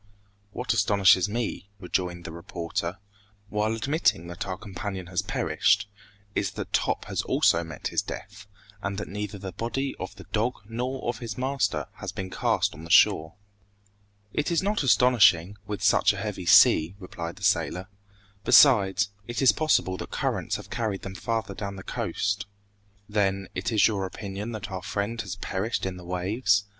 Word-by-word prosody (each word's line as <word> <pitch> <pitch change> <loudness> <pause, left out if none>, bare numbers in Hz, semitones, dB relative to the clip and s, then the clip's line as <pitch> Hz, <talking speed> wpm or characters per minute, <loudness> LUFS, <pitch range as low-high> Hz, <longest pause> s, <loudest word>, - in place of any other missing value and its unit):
"What 125 +2 -1
astonishes 100 -3 +4
me," 105 -3 -3
rejoined 90 -2 -2
the - - -5
reporter, 85 +1 -4 0.5
"while 105 +2 0
admitting 135 - +1
that 85 - -5
our 95 -1 -3
companion 95 -2 -6
has 90 0 -1
perished, 100 0 +1 0.5
is - - 0
that - - -6
Top - - +1
has - - -2
also 85 +1 +3
met 80 -3 -5
his - - +1
death, 105 +1 -8 0.3
and 100 -1 -3
that - - -4
neither 105 +1 -5
the 95 -1 -6
body 130 +8 -2
of 95 - -6
the 95 - -11
dog 115 +4 +1
nor 125 +4 -3
of 120 - -2
his 115 -4 -6
master 130 -5 0
has - - -5
been 95 -1 -6
cast - - +1
on 80 - -11
the 85 - -9
shore!" 80 0 +5 1.0
"It 150 - 0
is 170 +1 +1
not 205 +2 +1
astonishing, 110 - +4
with 105 -2 -4
such 100 - +4
a - - -7
heavy 95 -3 -4
sea," 80 +3 +6
replied 85 -3 -6
the - - -13
sailor. 90 +3 +1 0.6
"Besides, 105 -4 +6 0.2
it 120 - -3
is 135 - +6
possible 150 -12 +1
that - - -7
currents - - -1
have - - -8
carried 110 -4 -2
them 95 - -6
farther 110 +1 -2
down 100 0 -5
the 95 - -9
coast." 100 +1 -2 0.6
"Then, 100 -2 0
it 95 +5 -2
is 110 -2 +5
your 100 -3 -1
opinion 100 +3 -6
that 105 -2 -6
our 95 -1 -4
friend 105 +4 -2
has 100 -3 -5
perished 100 +3 -2
in 95 -1 -3
the 90 - -11
waves?" 100 +4 +1
100 Hz, 170 wpm, -26 LUFS, 95-115 Hz, 1.0 s, sea